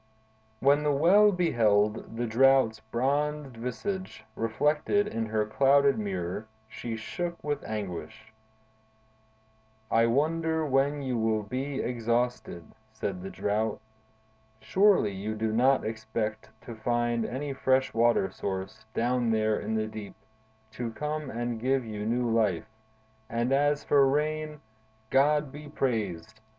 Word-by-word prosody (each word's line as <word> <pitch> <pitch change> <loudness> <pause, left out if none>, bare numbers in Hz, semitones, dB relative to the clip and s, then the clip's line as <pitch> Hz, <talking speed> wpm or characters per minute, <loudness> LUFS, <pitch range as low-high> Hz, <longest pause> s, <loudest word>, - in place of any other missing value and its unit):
When 140 +2 +4
the 150 0 +1
Well 185 +9 +5
beheld 110 - +1
the 120 - -1
Drought's 120 -1 +4
bronzed 140 +4 -1
visage 125 - -5
reflected 150 - +1
in 115 - -3
her 110 -1 0
clouded 140 +4 +3
mirror, 95 0 -3 0.2
she 115 +1 -6
shook 170 +10 -5
with 145 -1 -2
anguish. 110 +2 -6 1.6
"I 115 +1 +4
wonder 160 +5 +1
when 140 +1 +1
you 125 -3 -1
will 110 -1 +1
be 130 +6 -3
exhausted," 120 -6 -1 0.3
said 100 -4 -4
the 95 - -6
Drought. 105 +2 -1 0.8
"Surely, 185 - +3
you 100 +3 -4
do 110 0 -1
not 130 +4 +3
expect 110 -1 -4
to 120 - -8
find 120 +1 0
any 135 +5 -4
fresh 130 0 +1
water 115 -4 +2
source, 95 +4 -5
down 120 0 +1
there 110 -1 +1
in 110 +2 -3
the 110 0 0
deep, 110 -2 -8 0.6
to 115 +1 -4
come 150 0 -3
and 120 0 -3
give 130 +1 +1
you 105 -1 -5
new 120 +1 0
life; 110 -6 +1 0.6
and 120 +3 0
as 145 +1 +2
for 140 -2 +4
rain—God 145 -2 -1
be 150 +1 -10
praised! 110 - -2
120 Hz, 125 wpm, -28 LUFS, 110-140 Hz, 1.6 s, Well